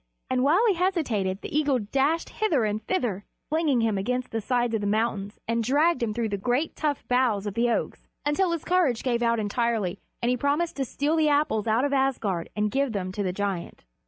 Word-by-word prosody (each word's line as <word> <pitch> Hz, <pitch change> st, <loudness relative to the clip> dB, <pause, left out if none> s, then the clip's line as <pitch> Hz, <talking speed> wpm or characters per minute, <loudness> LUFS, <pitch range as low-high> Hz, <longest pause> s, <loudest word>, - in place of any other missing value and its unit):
And 255 Hz, -1 st, +2 dB
while 340 Hz, -, +4 dB
he 415 Hz, -, +4 dB
hesitated 270 Hz, -, 0 dB
the -, -, -6 dB
eagle 290 Hz, -3 st, +3 dB
dashed 275 Hz, +9 st, 0 dB
hither 320 Hz, -, +1 dB
and 210 Hz, +1 st, -2 dB
thither, 225 Hz, -, -1 dB, 0.3 s
flinging 305 Hz, -5 st, +2 dB
him 220 Hz, -3 st, +1 dB
against 250 Hz, +5 st, -2 dB
the 225 Hz, -, -2 dB
sides 240 Hz, +1 st, 0 dB
of 220 Hz, -, 0 dB
the 205 Hz, -, -1 dB
mountains 210 Hz, -1 st, -1 dB
and 230 Hz, 0 st, 0 dB
dragging 275 Hz, -1 st, +2 dB
him -, -, -3 dB
through 230 Hz, -2 st, -1 dB
the 200 Hz, -1 st, -2 dB
great 250 Hz, +9 st, 0 dB
tough 295 Hz, -3 st, -2 dB
boughs 245 Hz, -5 st, +2 dB
of 205 Hz, -, -3 dB
the 235 Hz, +2 st, +1 dB
oaks 235 Hz, -, -2 dB, 0.2 s
until 320 Hz, +6 st, +2 dB
his 335 Hz, -2 st, -3 dB
courage 345 Hz, -10 st, +2 dB
gave 240 Hz, -2 st, 0 dB
out 235 Hz, -1 st, +2 dB
entirely, 210 Hz, -3 st, -1 dB, 0.2 s
and 240 Hz, +1 st, +1 dB
he 250 Hz, -, +1 dB
promised 290 Hz, +6 st, 0 dB
to 270 Hz, -, 0 dB
steal 290 Hz, +5 st, -1 dB
the 310 Hz, -2 st, +3 dB
Apples 285 Hz, -7 st, +1 dB
out 225 Hz, +5 st, +2 dB
of 285 Hz, -, -1 dB
Asgard 235 Hz, -10 st, 0 dB
and 210 Hz, 0 st, 0 dB
give 270 Hz, -1 st, 0 dB
them 185 Hz, -2 st, -3 dB
to 205 Hz, -, -4 dB
the 185 Hz, -2 st, 0 dB
giant. 190 Hz, -, -4 dB
240 Hz, 215 wpm, -26 LUFS, 210-290 Hz, 0.3 s, while